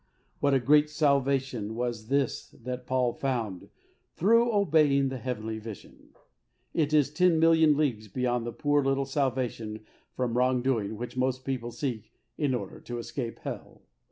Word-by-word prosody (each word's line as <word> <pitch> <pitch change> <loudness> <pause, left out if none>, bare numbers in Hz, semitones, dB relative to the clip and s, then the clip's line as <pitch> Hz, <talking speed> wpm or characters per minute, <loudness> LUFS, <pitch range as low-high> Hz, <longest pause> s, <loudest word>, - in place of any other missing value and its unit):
What 140 -1 +3
a - - +4
great 150 +4 +4
salvation 135 -7 +1
was 120 -2 -3
this 140 0 0
that 125 0 -5
Paul 125 -2 +1
found 115 -9 -3 0.5
through 230 +6 +4
obeying 155 -9 +3
the 130 -1 -5
heavenly 110 -3 -4
vision! 110 -2 -11 0.6
It 155 -3 +1
is 145 -2 +3
ten 180 -1 +3
million 160 -2 +5
leagues 120 -8 0
beyond 120 +2 -1
the - - -3
poor 145 +3 +1
little 135 0 +1
salvation 125 -6 -2 0.3
from 125 -2 -1
wrong 125 -1 +2
doing 110 -5 0
which 120 +3 -6
most 130 0 0
people 125 -3 -3
seek 120 -3 -4 0.2
in 140 -4 0
order 100 -6 -6
to 120 - -6
escape 120 0 -5
hell. - - -7
130 Hz, 155 wpm, -28 LUFS, 120-145 Hz, 0.6 s, million